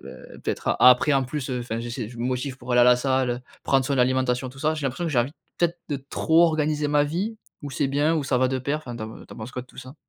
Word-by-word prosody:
heu, -, -, -12 dB
peut-être -, -, -1 dB
après, 125 Hz, +4 st, +6 dB
en 135 Hz, -, +3 dB
plus, 130 Hz, +1 st, -4 dB
enfin, 120 Hz, -3 st, -3 dB
j'essaie 120 Hz, -1 st, -4 dB
je 120 Hz, 0 st, -12 dB
me 120 Hz, -, -2 dB
motive 130 Hz, +1 st, -2 dB
pour 125 Hz, 0 st, -5 dB
aller 120 Hz, -, +5 dB
à -, -, +7 dB
la 125 Hz, 0 st, +6 dB
salle, 130 Hz, 0 st, +1 dB
heu, 120 Hz, -, -3 dB, 0.2 s
prendre 135 Hz, -1 st, +2 dB
soin 140 Hz, -, 0 dB
de 130 Hz, -, +2 dB
l'alimentation, 130 Hz, 0 st, +1 dB
tout 135 Hz, -, -13 dB
ça. 155 Hz, +3 st, +1 dB
J'ai 155 Hz, -, -5 dB
l'impression 135 Hz, +7 st, -3 dB
que 165 Hz, -, -1 dB
j'ai 120 Hz, -, +4 dB
envie 125 Hz, +4 st, -2 dB, 0.2 s
peut-être 175 Hz, 0 st, 0 dB
de 145 Hz, -, -1 dB
trop 160 Hz, +4 st, +2 dB
organiser 150 Hz, -2 st, 0 dB
ma 145 Hz, 0 st, +3 dB
vie, 190 Hz, +9 st, -2 dB, 0.3 s
ou 145 Hz, -, -6 dB
c'est 135 Hz, +1 st, 0 dB
bien? 145 Hz, +4 st, +1 dB
Ou 145 Hz, -, -1 dB
ça 130 Hz, -2 st, +1 dB
va 130 Hz, 0 st, +3 dB
de 130 Hz, -, -1 dB
pair? 140 Hz, +4 st, -1 dB
Enfin 125 Hz, -6 st, -8 dB
tu 115 Hz, -, -6 dB
en -, -, -7 dB
pen 110 Hz, -, -11 dB
tu -, -, -12 dB
en -, -, -15 dB
penses 110 Hz, +3 st, -7 dB
quoi 125 Hz, -, -4 dB
de -, -, -19 dB
tout -, -, -20 dB
ça? 130 Hz, +2 st, -9 dB
130 Hz, 310 wpm, -24 LUFS, 125-150 Hz, 0.3 s, à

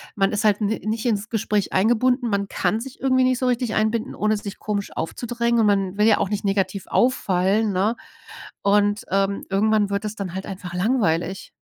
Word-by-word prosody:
man 195 Hz, -1 st, +2 dB
ist 210 Hz, +2 st, -1 dB
halt 210 Hz, -1 st, +3 dB
n 210 Hz, -, +2 dB
nicht 220 Hz, +2 st, -3 dB
ins 215 Hz, -1 st, -1 dB
Gespräch 210 Hz, -3 st, -1 dB
eingebunden. 240 Hz, +5 st, +2 dB
Man 200 Hz, -1 st, 0 dB
kann 195 Hz, +4 st, 0 dB
sich 270 Hz, +1 st, -9 dB
irgendwie 260 Hz, -1 st, +3 dB
nicht 255 Hz, -1 st, +1 dB
so 255 Hz, -, -1 dB
richtig 245 Hz, -2 st, 0 dB
einbinden, 220 Hz, +3 st, 0 dB
ohne 215 Hz, +1 st, +1 dB
sich 205 Hz, -1 st, -8 dB
komisch 205 Hz, -2 st, -3 dB
aufzudrängen. 235 Hz, +6 st, -1 dB
Und -, -, +3 dB
man 195 Hz, -1 st, +1 dB
will 210 Hz, +1 st, +4 dB
ja 220 Hz, -, +5 dB
auch -, -, +1 dB
nicht 210 Hz, -1 st, -2 dB
negativ 195 Hz, -1 st, -1 dB
auffallen, 205 Hz, -3 st, +1 dB
ne? 200 Hz, +5 st, +1 dB, 0.7 s
Und, 205 Hz, +1 st, +2 dB
ähm, 195 Hz, +1 st, 0 dB
irgendwann 210 Hz, +1 st, +2 dB
wird 200 Hz, +1 st, -2 dB
das 210 Hz, 0 st, -4 dB
dann 190 Hz, -3 st, -5 dB
halt 190 Hz, -, -4 dB
einfach 185 Hz, -2 st, -7 dB
langweilig. 185 Hz, -3 st, 0 dB
210 Hz, 195 wpm, -22 LUFS, 195-225 Hz, 0.7 s, ja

